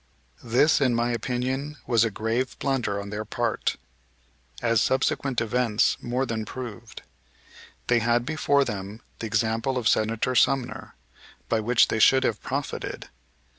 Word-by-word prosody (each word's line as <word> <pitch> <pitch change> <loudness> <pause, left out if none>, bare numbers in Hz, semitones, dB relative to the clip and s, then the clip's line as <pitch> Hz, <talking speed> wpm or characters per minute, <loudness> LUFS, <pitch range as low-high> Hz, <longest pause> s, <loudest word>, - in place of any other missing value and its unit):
This 125 +7 +3
in 125 -4 +3
my 120 +1 +1
opinion 130 +5 -2
was 115 -3 +3
a 115 - +1
grave 115 +5 -2
blunder 125 -7 -1
on 100 0 -7
their 105 +1 -3
part, 115 +1 -1 0.8
as 115 -2 +2
subsequent 130 -1 +1
events 115 -1 +1
more 125 +2 -1
than 115 -3 -3
proved. 115 -2 -8 0.8
They 120 -1 +3
had 120 +1 +1
before 145 -2 +2
them 100 +1 -6 0.2
the 115 - -3
example 115 +4 0
of 120 -3 0
Senator 110 +4 +1
Sumner, 125 +1 +1 0.5
by 115 - +2
which 115 +2 +3
they 110 - 0
should 130 +4 +5
have 105 - -1
profited. 140 +2 -4
120 Hz, 140 wpm, -25 LUFS, 110-130 Hz, 0.8 s, should